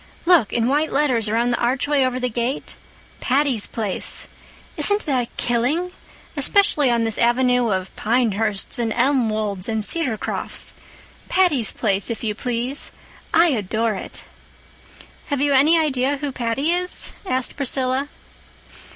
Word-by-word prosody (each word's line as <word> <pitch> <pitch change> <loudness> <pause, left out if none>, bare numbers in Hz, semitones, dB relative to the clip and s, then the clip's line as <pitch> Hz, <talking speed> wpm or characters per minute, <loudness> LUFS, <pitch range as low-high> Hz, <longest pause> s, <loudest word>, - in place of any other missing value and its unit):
"Look—in 240 - +3
white 295 +4 +1
letters, 255 -7 +1
around 235 +3 +1
the 240 - -1
archway 270 +3 +1
over 255 0 -1
the 250 - -1
gate. 240 +3 -3 0.4
'Patty's 265 -4 +1
Place.' 215 -5 -2 0.5
Isn't 410 +1 +2
that 255 -5 -2
killing? 265 +10 0 0.4
Especially 395 - +3
on 235 -1 +1
this 225 -2 -1
Avenue 245 0 +2
of 185 -2 -3
Pinehursts 220 -3 0
and 230 -1 -1
Elmwolds 220 -7 +1
and 220 -1 -1
Cedarcrofts? 250 -5 -2 0.6
'Patty's 305 - +2
Place,' 200 -2 -1
if 230 -1 -5
you 215 -2 -1
please! 245 +4 -3 0.4
I 335 +1 +5
adore 220 -2 -1
it." 195 - -8 1.0
"Have 285 -3 -1
you 285 0 +2
any 295 +5 +5
idea 280 -3 +1
who 285 0 -4
Patty 255 +5 -1
is?" 360 +1 -1
asked 260 -9 -1
Priscilla. 265 0 0
250 Hz, 130 wpm, -21 LUFS, 225-285 Hz, 1.0 s, I